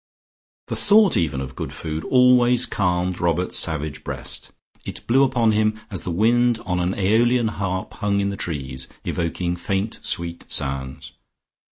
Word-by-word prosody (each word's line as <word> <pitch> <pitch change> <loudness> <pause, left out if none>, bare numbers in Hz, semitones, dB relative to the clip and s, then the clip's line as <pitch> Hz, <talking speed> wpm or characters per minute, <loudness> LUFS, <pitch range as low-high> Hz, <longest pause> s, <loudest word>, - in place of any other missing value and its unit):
The - - -4
thought 210 -2 +4
even 75 -5 0
of 65 0 -7
good - - -5
food 80 0 -5
always 125 -1 +5
calmed 90 -1 -1
Robert's 85 +1 +3
savage 80 -2 0
breast; - - -4 0.3
it - - -8
blew 130 +3 +3
upon 125 -4 +3
him 110 0 +1
as 95 - -4
the - - -5
wind 120 +6 +2
on 90 -1 -1
an 90 +2 -1
AEolian 115 +4 +2
harp 95 -3 -4
hung 100 -1 -1
in 100 0 0
the 100 - -4
trees, 65 -8 -5 0.2
evoking 85 +1 -2
faint 95 +4 -3
sweet 85 0 -2
sounds. 65 -2 -4
95 Hz, 155 wpm, -22 LUFS, 85-115 Hz, 0.3 s, always